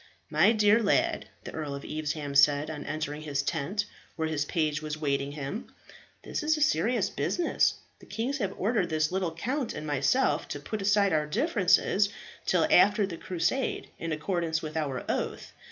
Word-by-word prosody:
"My 165 +8 +5
dear 215 0 +4
lad," 320 +11 +1 0.2
the - - -7
Earl 150 -3 -4
of 140 - -8
Evesham 150 -2 -3
said 145 +2 +4
on 150 -2 -6
entering 150 0 -3
his 145 -2 -2
tent 195 +9 -1 0.3
where 160 -1 -1
his 150 -2 -1
page 155 -1 0
was 155 0 -4
waiting 140 -2 -1
him, 145 - -5 0.6
"this - - -3
is 310 +1 +2
a - - -4
serious 235 - +2
business. 350 -1 +1 0.2
The - - -16
kings 260 +6 -2
have 195 -4 -2
ordered 205 -2 +1
this 155 0 +1
little 185 -2 -1
count 255 - -2
and 155 - -5
myself 145 - +1
to - - -5
put 215 -2 -5
aside 200 -1 +3
our 150 -1 +1
differences 200 - +2 0.4
till 175 -3 +3
after 205 +3 +5
the 185 -3 -6
Crusade, 180 +11 -1
in 165 - -3
accordance 160 +1 -1
with 155 0 -6
our 140 -5 -2
oath. - - -3
165 Hz, 175 wpm, -28 LUFS, 150-210 Hz, 0.6 s, My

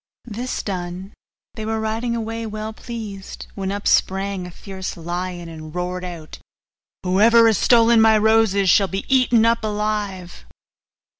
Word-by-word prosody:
This 240 +2 -4
done, 185 0 -5 0.4
they 220 - -6
were 220 0 -2
riding 225 +2 -2
away 225 0 -4
well 215 +1 -5
pleased, 215 -4 -8
when 195 -1 -3
up 205 0 -3
sprang 195 -1 +1
a - - -8
fierce 190 +1 -7
lion, 175 +1 -5
and 155 -1 -10
roared 180 +1 -3
out, 170 -4 -8 0.6
'Whoever 220 +6 +5
has 220 -4 +3
stolen 230 -1 +5
my 220 -1 +6
roses 215 -2 +3
shall 195 +2 +5
be 195 +2 -4
eaten 240 -3 +4
up 230 0 +2
alive! 210 -4 -3
205 Hz, 145 wpm, -21 LUFS, 185-225 Hz, 0.6 s, my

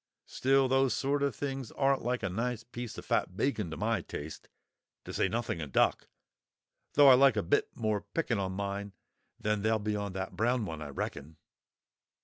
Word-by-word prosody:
Still, 135 0 +2
those 135 -2 +3
sort 140 +1 0
of 140 0 0
things 135 -4 -4
aren't 135 -1 +2
like 125 0 -1
a 95 - 0
nice 115 +4 -2
piece 120 0 -7
of - - -8
fat 90 - 0
bacon 110 -9 0
to 80 - -6
my - - 0
taste, 75 +1 -8 0.6
to - - -7
say - - +2
nothing 115 -5 -2
of 75 -3 -6
duck; - - +2 0.9
though 145 -1 +7
I - - +10
like 135 +1 +5
a - - +1
bit 145 - +1
more 110 -3 0
picking 125 -10 0
on 95 -1 -2
mine 100 +1 -4 0.5
than 105 -1 0
they'll 110 +1 +2
be 105 0 -2
on 100 -2 -3
that 95 0 -4
brown 120 0 +1
one, 80 -4 -6
I 75 - -6
reckon." 70 +2 -5
110 Hz, 190 wpm, -31 LUFS, 95-130 Hz, 0.9 s, I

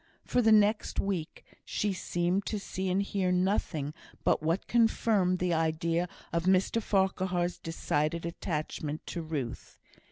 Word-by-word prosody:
For 250 - +2
the 220 -1 +4
next 215 0 +3
week, 185 -6 -3 0.2
she 205 -1 -1
seemed 180 +1 -1
to 215 - -1
see 190 -1 -3
and 190 +2 +2
hear 195 -2 0
nothing 180 -5 0 0.3
but - - +3
what 165 +5 0
confirmed 220 -5 +3
the 180 -1 0
idea 165 +2 0 0.2
of 170 0 0
Mr 190 +4 +3
Farquhar's 185 -3 0
decided 165 0 -1
attachment 155 -3 -4
to 170 - -4
Ruth. 150 -7 -5
180 Hz, 135 wpm, -30 LUFS, 165-195 Hz, 0.3 s, the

